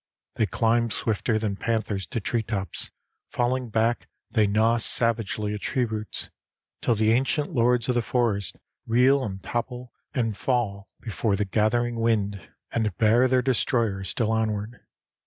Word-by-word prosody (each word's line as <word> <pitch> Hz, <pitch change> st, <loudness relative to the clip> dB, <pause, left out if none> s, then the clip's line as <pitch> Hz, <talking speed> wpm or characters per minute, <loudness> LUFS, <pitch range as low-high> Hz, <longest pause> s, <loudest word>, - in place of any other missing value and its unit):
They 110 Hz, -, +1 dB
climb 115 Hz, +4 st, +2 dB
swifter 110 Hz, +1 st, 0 dB
than 105 Hz, -3 st, -2 dB
panthers 110 Hz, -4 st, -1 dB
to 120 Hz, -, -3 dB
treetops, 105 Hz, -3 st, -3 dB, 0.4 s
falling 125 Hz, 0 st, 0 dB
back 115 Hz, +2 st, +1 dB, 0.2 s
they 110 Hz, -4 st, +3 dB
gnaw 110 Hz, +3 st, +3 dB
savagely 115 Hz, -2 st, 0 dB
at 105 Hz, -, -5 dB
tree 130 Hz, -3 st, 0 dB
roots, 110 Hz, -1 st, -5 dB, 0.5 s
till 120 Hz, -, +2 dB
the 110 Hz, 0 st, +3 dB
ancient 135 Hz, +6 st, +1 dB
lords 120 Hz, -2 st, +2 dB
of 125 Hz, -, +2 dB
the 120 Hz, -, +2 dB
forest 115 Hz, -5 st, 0 dB, 0.3 s
reel 130 Hz, +4 st, +4 dB
and 95 Hz, -4 st, -5 dB
topple 125 Hz, +1 st, -4 dB, 0.2 s
and 115 Hz, -5 st, 0 dB
fall 100 Hz, -5 st, -1 dB
before 110 Hz, -2 st, -1 dB
the 105 Hz, +1 st, 0 dB
gathering 115 Hz, +4 st, +1 dB
wind, 105 Hz, -4 st, +1 dB, 0.3 s
and 110 Hz, -5 st, -1 dB
bear 115 Hz, +3 st, +4 dB
their 130 Hz, 0 st, +2 dB
destroyer 115 Hz, -6 st, +1 dB
still 110 Hz, +5 st, 0 dB
onward. 110 Hz, +1 st, -1 dB
115 Hz, 145 wpm, -26 LUFS, 105-120 Hz, 0.5 s, reel